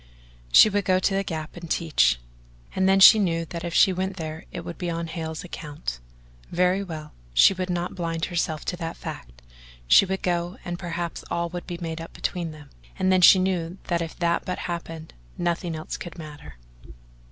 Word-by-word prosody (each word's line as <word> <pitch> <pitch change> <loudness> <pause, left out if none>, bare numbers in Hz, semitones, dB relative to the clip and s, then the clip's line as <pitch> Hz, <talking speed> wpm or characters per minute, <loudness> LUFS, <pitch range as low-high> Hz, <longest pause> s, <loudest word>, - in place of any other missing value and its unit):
She - - +9
would 205 -1 0
go 185 -1 +3
to 190 +1 +1
the 195 0 +1
Gap 160 -3 -5
and 170 -2 -9
teach; - - +2 0.6
and 190 0 +3
then 195 0 +5
she 215 +3 +10
knew 165 -4 0
that 165 0 -7
if 170 -1 -4
she 190 - +6
went 190 +1 -3
there 160 -1 -6
it - - -5
would 170 - -8
be 175 - -2
on 170 0 -2
Hale's 160 -1 -5
account. 150 - -6 0.5
Very 180 +3 +2
well, 155 -5 -8 0.2
she 195 - +7
would 185 0 -4
not 175 0 -2
blind 165 -2 -2
herself 165 -3 -2
to 180 - -3
that 165 -2 -5
fact; - - -9 0.4
she 65 - +6
would 190 +1 -3
go 175 0 -1
and 175 0 -4
perhaps 170 -1 -4
all 170 0 -1
would 175 0 -7
be 175 - -5
made 165 -2 -4
up 165 - -9
between 175 -2 -3
them, 150 -3 -12 0.3
and 185 0 +2
then 185 -1 +4
she 185 - +9
knew 185 -2 -1
that 170 -1 +1
if 165 -1 -5
that 170 -1 +1
but 180 - -3
happened, 165 -2 -6 0.2
nothing 175 -1 -1
else 155 - -5
could 175 - -9
matter... 150 - -10
170 Hz, 200 wpm, -25 LUFS, 160-180 Hz, 0.6 s, she